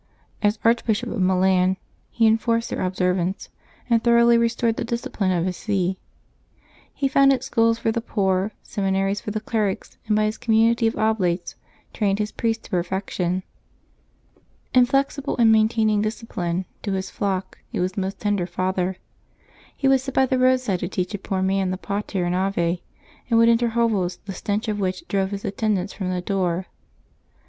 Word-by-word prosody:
As 210 +1 +2
Archbishop 230 0 +2
of 220 - -2
Milan 185 0 +3 0.3
he 230 - +1
enforced 230 +1 +2
their - - -2
observance, 185 0 -1 0.4
and 230 -2 +2
thoroughly 235 0 +5
restored 230 0 +1
the - - -1
discipline 235 -4 -2
of 175 -1 +1
his 185 -1 -2
see. 190 -3 -1 0.9
He 275 - -1
founded 275 -1 +4
schools 230 -3 +2
for 225 -1 0
the 230 +1 -2
poor, 195 -3 0
seminaries 195 0 -1
for - - -5
the 215 +1 -2
clerics, 215 -3 -2
and 210 - +2
by 215 - +3
his 215 +1 -2
community 225 +1 +3
of 225 - -1
Oblates 190 -6 0 0.4
trained 200 -2 +1
his 210 0 -2
priests 225 -1 -1
to - - -15
perfection. 185 0 -1 1.3
Inflexible 275 +2 +2
in 230 -2 +5
maintaining 220 -1 +3
discipline, 190 -5 -3 0.2
to 200 - -2
his 190 0 -3
flock 190 -2 -3
he - - -3
was 185 +1 -1
a - - -2
most 195 0 -3
tender 205 -4 0
father. 185 +1 -1 0.8
He 275 - +1
would 270 -1 +4
sit 270 0 -6
by 265 - +5
the 260 0 0
roadside 255 -7 +2
to 175 - -2
teach 180 +1 -3
a 205 - -3
poor 190 -1 -2
man 190 0 +1
the 185 - -2
Pater 200 -1 -3
and 175 - 0
Ave, 180 -2 0 0.5
and 230 - +3
would 230 0 +6
enter 235 +1 +3
hovels 220 -6 0
the 195 - -5
stench 205 +4 -2
of 210 -1 -1
which 185 -2 -2
drove 195 -1 0
his 200 0 -5
attendants 200 -1 -1
from 190 -3 -4
the 180 -1 -1
door. 180 -1 -1
205 Hz, 170 wpm, -23 LUFS, 185-230 Hz, 1.3 s, would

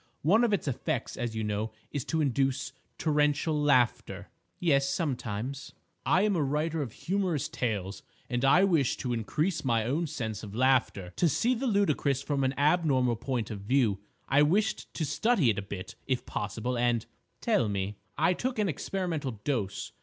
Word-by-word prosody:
One 205 - +4
of 235 - +3
its 200 -6 0
effects, 135 0 -2
as 120 -3 -3
you 110 - -2
know, 105 +1 -2 0.2
is 145 -4 -2
to 160 - 0
induce 135 -2 0 0.2
torrential 150 0 +1
laughter—" 120 -9 +1 0.3
"Yes: 140 -5 +3
sometimes." 130 - -3 0.3
"—I 185 - +4
am 210 -2 +2
a 165 - +1
writer 150 +3 0
of 130 -6 -4
humorous 175 - -1
tales, 105 - -3 0.3
and 120 +1 -2
I 160 +8 +6
wished 165 -10 +2
to 125 -2 -1
increase 150 - -1
my 115 -4 +1
own 155 +8 0
sense 110 -8 -4
of 105 -1 -8
laughter—to 130 - +2
see 235 - +2
the 255 +2 -2
ludicrous 150 - +1
from 140 -1 0
an 130 0 0
abnormal 140 -5 +3
point 120 -2 -3
of 105 - -5
view. 110 -2 +2 0.3
I 135 +2 +4
wished 200 +9 +1
to 160 - -1
study 185 - +2
it 100 - -2
a - - -3
bit, 95 -1 -7
if 130 -2 -1
possible, 110 +5 -3
and—" 120 -1 +1 0.3
"Tell 110 - +2
me!" 100 0 -2 0.2
"I 180 - +3
took 250 +6 -3
an 210 -2 +2
experimental 160 -4 -2
dose. 115 -10 -2
135 Hz, 170 wpm, -29 LUFS, 115-160 Hz, 0.3 s, I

